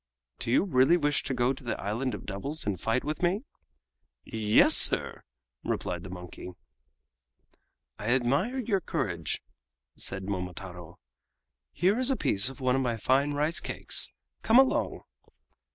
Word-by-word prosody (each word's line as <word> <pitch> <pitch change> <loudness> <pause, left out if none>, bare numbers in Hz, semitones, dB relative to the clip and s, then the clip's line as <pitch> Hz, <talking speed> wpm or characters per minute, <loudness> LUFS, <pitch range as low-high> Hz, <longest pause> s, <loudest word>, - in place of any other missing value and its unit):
"Do - - -4
you 120 - +4
really 150 -2 +4
wish 145 -3 +1
to 135 - -2
go 125 +2 +2
to 135 - -12
the 120 - -3
Island 110 +4 -2
of - - -10
Devils 120 +10 -4
and 100 -4 -2
fight 115 +3 0
with 150 +1 -4
me?" 185 +6 +1 0.8
"Yes, 110 -1 +4
sir," - - +2 0.4
replied 85 - -3
the 95 - -9
monkey. 90 0 -9 1.5
"I 105 - -5
admire 140 - +1
your 210 -6 0
courage," - - -3 0.5
said 95 0 -3
Momotaro. 90 -2 -6 0.7
"Here 195 +7 +1
is 255 +1 +4
a 270 - +2
piece 100 +5 +3
of 135 - -12
one 130 -1 +1
of 135 - +1
my 120 -3 -1
fine 135 +6 +2
rice 150 +4 +3
cakes. - - -2 0.3
Come 225 +2 +4
along!" 265 0 +3
130 Hz, 150 wpm, -28 LUFS, 100-155 Hz, 1.5 s, you